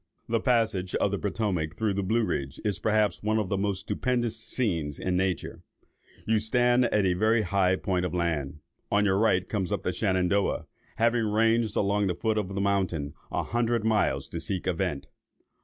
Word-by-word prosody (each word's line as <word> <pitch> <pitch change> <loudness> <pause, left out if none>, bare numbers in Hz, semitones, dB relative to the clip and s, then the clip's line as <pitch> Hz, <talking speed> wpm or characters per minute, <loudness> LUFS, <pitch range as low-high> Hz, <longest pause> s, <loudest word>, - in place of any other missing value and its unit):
"The 115 0 +1
passage 110 -7 +1
of 100 - +1
the 100 - -1
Potomac 95 -7 -2
through 110 -2 0
the 100 - -1
Blue 110 +4 +1
Ridge, 70 -6 -3
is, 105 -3 0
perhaps, 110 -1 +1
one 110 +1 +1
of 105 -4 -1
the - - 0
most 100 -1 -1
stupendous 120 +1 -1
scenes 90 - -2
in 90 -1 -1
nature. 95 -1 -1 0.6
You 110 0 +2
stand 120 +3 +3
on 105 -3 +1
a 90 - +3
very 110 +4 +2
high 95 -1 +2
point 95 -1 -1
of 90 - -2
land; 80 -4 -2 0.3
on 105 0 +3
your 95 -1 +2
right 100 -5 +2
comes 95 -5 -2
up - - -2
the - - -1
Shenandoah, 95 +1 +1 0.3
having 115 0 +2
ranged 115 +1 +2
along 100 0 +1
the 90 - -1
foot 110 +4 0
of 100 -2 -4
the 100 - -1
mountain 95 -7 0 0.2
a - - -1
hundred 120 -1 0
miles 110 -2 +1
to - - -5
seek 95 -3 -3
a 95 - +1
vent. 80 -6 -2
100 Hz, 190 wpm, -27 LUFS, 90-110 Hz, 0.6 s, stand